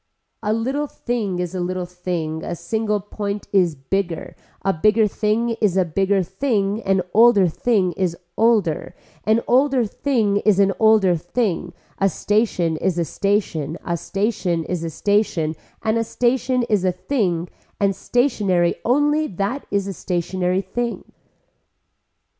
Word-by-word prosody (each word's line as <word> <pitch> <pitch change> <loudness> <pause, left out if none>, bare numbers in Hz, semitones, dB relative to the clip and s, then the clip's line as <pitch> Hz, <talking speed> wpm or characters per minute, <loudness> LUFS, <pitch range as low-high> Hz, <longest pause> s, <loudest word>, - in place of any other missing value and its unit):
A 210 -1 -1
little 265 +7 -1
thing 225 -9 -3
is 180 -1 -3
a 185 - -3
little 180 0 -2
thing, 175 -3 -4
a 175 - -3
single 215 +3 -1
point 205 0 -5
is 180 -5 +3
bigger, 170 +5 -3 0.3
a 195 - +3
bigger 215 +6 +3
thing 215 +3 0
is 195 -4 +2
a 185 - +3
bigger 195 +3 +1
thing, 200 +1 -1
an 195 -2 +1
older 220 -4 +6
thing 190 +2 +1
is 175 -2 -2 0.2
older, 215 -8 +1 0.3
an 220 +2 +3
older 260 -1 +3
thing 215 -3 0
is 205 -1 +3
an 195 0 +4
older 220 -5 +5
thing, 175 +3 -2 0.3
a 195 - +3
station 185 -4 0
is 175 +2 -1
a 170 - +1
station, 170 -5 -1
a 170 - 0
station 195 -2 -1
is 175 0 -3
a 165 - -2
station 170 -3 0 0.3
and 220 +1 +1
a - - +1
station 250 +2 +1
is 210 -5 +1
a 185 - +3
thing 180 -4 -1 0.3
and 200 -1 +2
stationary 200 -10 +1
only 295 +5 +2
that 200 +9 -3
is 200 -1 0
a 195 - -4
stationary 180 +1 -1
thing. 235 +5 -3
200 Hz, 145 wpm, -21 LUFS, 180-225 Hz, 0.3 s, older